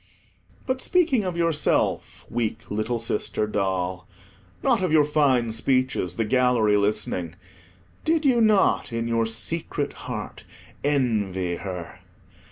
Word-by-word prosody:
But 260 0 -1
speaking 315 - +2
of 180 -2 -3
yourself, 165 -3 0
weak 115 -2 -3
little 110 +3 -1
sister 110 -1 -1
doll, 95 -3 -2 0.6
not 245 -6 +3
of 185 -3 0
your 155 -2 +5
fine 135 -6 +2
speeches, 130 -6 0
the 115 - 0
gallery 125 -3 +3
listening, 100 -5 -1 0.7
did 315 -1 +1
you 250 -4 +4
not, 210 - +3
in 115 0 -2
your 115 -1 +1
secret 145 +5 -2 0.2
heart, - - -6 0.4
envy 105 -11 0
her? 90 -3 -7
115 Hz, 120 wpm, -24 LUFS, 105-155 Hz, 0.7 s, your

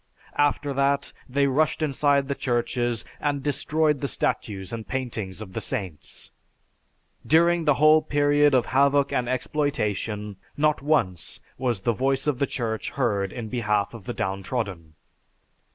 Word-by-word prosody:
After 145 -1 +2
that, 140 +1 +1 0.2
they 140 +2 +2
rushed 150 +4 +1
inside 140 -1 +2
the 140 - 0
churches 120 -2 -1
and 145 -2 -1
destroyed 150 0 +1
the 140 - 0
statues 100 -6 -2
and 115 -1 -5
paintings 110 -7 -4
of 95 -4 -9
the - - -3
saints. 95 - -6 0.9
During 170 +1 +3
the 150 -2 +4
whole 155 +2 +6
period 145 -1 +3
of 125 - +3
havoc 140 +1 +3
and 125 -1 0
exploitation, 105 -7 -1 0.2
not 150 0 +2
once 95 - 0 0.2
was 120 -6 -1
the 120 +3 +1
voice 135 +4 0
of 145 -4 0
the 140 - +1
Church 110 -3 -3
heard 100 -7 0
in 120 -3 -6
behalf 105 -4 0
of 110 -5 -10
the - - -3
downtrodden. 95 -4 -3
130 Hz, 145 wpm, -25 LUFS, 105-145 Hz, 0.9 s, whole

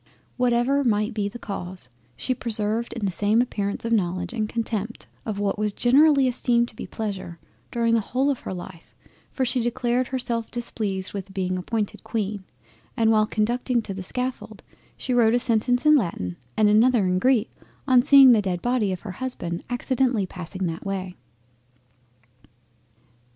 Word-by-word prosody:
Whatever 250 +3 +2
might 215 -1 +1
be 205 -2 -1
the 240 - -9
cause, 185 - -7 0.3
she 255 - +1
preserved 230 0 -1
the 200 -3 -1
same 205 +5 +2
appearance 205 -4 -1
of 230 - 0
knowledge, 180 -3 -1
and 215 -3 -2
contempt 225 -1 -3 0.2
of 210 -2 -3
what 205 0 -1
was 210 -1 0
generally 275 +3 +4
esteemed 240 -2 +1
pleasure, 195 -6 -5 0.3
during 230 -1 +1
the 230 - +4
whole 265 +7 0
of 270 - -3
her - - -7
life, 180 -2 -9 0.3
for 260 - -1
she 250 0 +1
declared 240 +1 0
herself 235 -3 -3
displeased 210 -5 -3
with 195 -1 -7
being 185 -1 -1
appointed 205 +3 -3
Queen, 205 -3 -3 0.5
and 225 -1 +3
while 215 -1 +3
conducting 240 +3 0
to 200 - -5
the 190 - -6
scaffold, 250 +7 -5 0.3
she 255 - -2
wrote 235 -1 +4
a - - +3
sentence 245 +2 +1
in 300 0 +7
Latin 165 - -1 0.2
and 215 - +4
another 225 +2 +4
in 185 0 +1
Greek 250 -1 +2 0.3
on 255 -2 +6
seeing 275 -1 +8
the 225 -3 +5
dead 185 -3 -2
Body 240 -5 +1
of 185 - -4
her 210 - -6
Husband 180 -6 -5
accidentally 245 -3 0
passing 185 +1 -6
that 165 0 -4
way. 190 -2 -4
220 Hz, 160 wpm, -24 LUFS, 195-245 Hz, 0.5 s, seeing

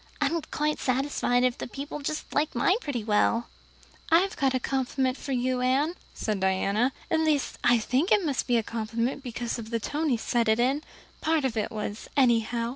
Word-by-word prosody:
I'm 335 0 +1
quite 300 0 -1
satisfied 255 -1 +1
if 250 -1 +1
the - - -4
people 280 +3 -6
just 300 +2 -4
liked 295 -1 0
mine 365 - +3
pretty 255 -7 -3
well." 220 +2 +2 0.6
"I've 360 +4 +4 0.2
a 255 - +1
compliment 260 0 0
for 280 - -7
you, 255 0 0
Anne," 270 +6 +2 0.2
said 215 -3 -2
Diana. 195 +6 +1 0.2
"At 320 - +3
least 310 -3 0
I 240 0 +5
think 255 - 0
it 410 -4 +4
must 280 -4 -1
be 245 -2 +3
a 225 - +1
compliment 230 +4 -2
because 240 -2 -4
of 220 -1 -7
the 230 0 -1
tone 300 +7 -1
he 245 - +2
said 230 0 0
it 220 +1 +3
in. 265 +5 +2 0.4
Part 315 -3 +1
of 245 -3 -1
it 215 - -1
was 210 -1 -5
anyhow. 235 -2 +2
255 Hz, 195 wpm, -27 LUFS, 230-290 Hz, 0.6 s, I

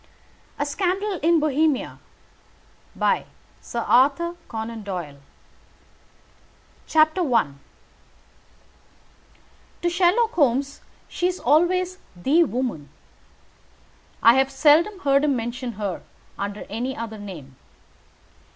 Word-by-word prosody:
V - - -30 0.5
A 290 - -1
SCANDAL 375 +5 -1
IN 335 +1 +4
BOHEMIA 305 -1 0 1.0
A. 275 +8 0
CONAN 225 0 -5
DOYLE 175 -8 -6 1.8
I 310 - +3 2.4
To 345 - +2
Sherlock 385 +6 +3
Holmes 280 - 0 0.3
she 355 - -1
is 365 0 -3
always 365 +4 +2 0.2
the 280 - +3
woman. 235 - -3 1.3
I 230 - +8
have 265 +1 +2
seldom 315 +8 +4
heard 275 -2 +3
him 290 -2 +2
mention 240 +1 -4
her 200 -3 -4 0.3
under 200 +1 -5
any 245 +6 -4
other 220 -2 -6
name. 160 -10 -10
275 Hz, 90 wpm, -23 LUFS, 225-340 Hz, 2.4 s, I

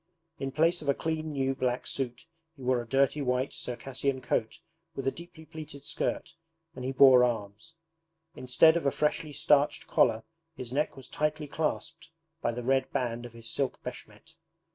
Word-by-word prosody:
In 135 0 -3
place 165 +5 +3
of 145 - -3
a 140 - +4
clean 160 -1 -2
new 135 -1 0
black 125 -1 -1
suit 125 -3 -3 0.3
he 135 - -12
wore 125 -1 +2
a 120 - -10
dirty 135 +3 +2
white 125 0 0
Circassian 130 +2 -3
coat 115 -3 -1 0.4
with 135 - -4
a 135 - +2
deeply 170 0 -12
pleated 155 -3 -9
skirt, - - -2 0.4
and 130 - -7
he 130 - -1
bore 130 -2 +7
arms. 110 +5 -3 0.6
Instead 145 +6 +5
of 170 -4 0
a - - +3
freshly 150 +1 0
starched 145 0 +2
collar, 110 -2 +3 0.3
his 125 -4 -6
neck 145 0 0
was 135 - -10
tightly 150 0 -1
clasped 160 +2 -3 0.3
by 120 - +1
the 120 +1 -5
red 130 +1 +1
band 120 -3 -2
of 120 - -17
his 115 0 -8
silk 135 +4 -1
BESHMET. 125 +5 -10
135 Hz, 175 wpm, -29 LUFS, 125-150 Hz, 0.6 s, bore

